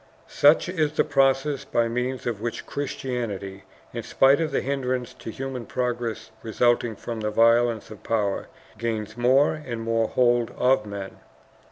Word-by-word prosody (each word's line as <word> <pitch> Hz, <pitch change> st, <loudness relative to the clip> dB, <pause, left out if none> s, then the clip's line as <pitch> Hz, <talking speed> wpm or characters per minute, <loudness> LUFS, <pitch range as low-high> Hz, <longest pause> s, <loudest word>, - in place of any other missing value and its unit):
"Such 150 Hz, +4 st, +4 dB
is 155 Hz, -4 st, 0 dB
the -, -, +3 dB
process 135 Hz, 0 st, +2 dB
by 115 Hz, 0 st, +1 dB
means 125 Hz, +2 st, -2 dB
of 115 Hz, -4 st, -3 dB
which 120 Hz, 0 st, -4 dB
Christianity, 115 Hz, -9 st, -4 dB, 0.3 s
in 115 Hz, -, -3 dB
spite 135 Hz, +6 st, +4 dB
of 160 Hz, -, 0 dB
the 140 Hz, -, 0 dB
hindrances 130 Hz, -2 st, -2 dB
to -, -, -7 dB
human 130 Hz, 0 st, -5 dB
progress 120 Hz, -2 st, -3 dB
resulting 120 Hz, 0 st, +1 dB
from 115 Hz, +2 st, -6 dB
the 105 Hz, 0 st, -1 dB
violence 115 Hz, 0 st, +3 dB
of 105 Hz, -, -10 dB
power, 105 Hz, -3 st, -1 dB, 0.3 s
gains 110 Hz, -2 st, -3 dB
more 130 Hz, +5 st, +4 dB
and 140 Hz, -7 st, -6 dB
more 115 Hz, 0 st, +1 dB
hold 120 Hz, -1 st, +2 dB
of 125 Hz, -4 st, +2 dB
men. 100 Hz, -1 st, -7 dB
120 Hz, 155 wpm, -25 LUFS, 115-135 Hz, 0.3 s, Such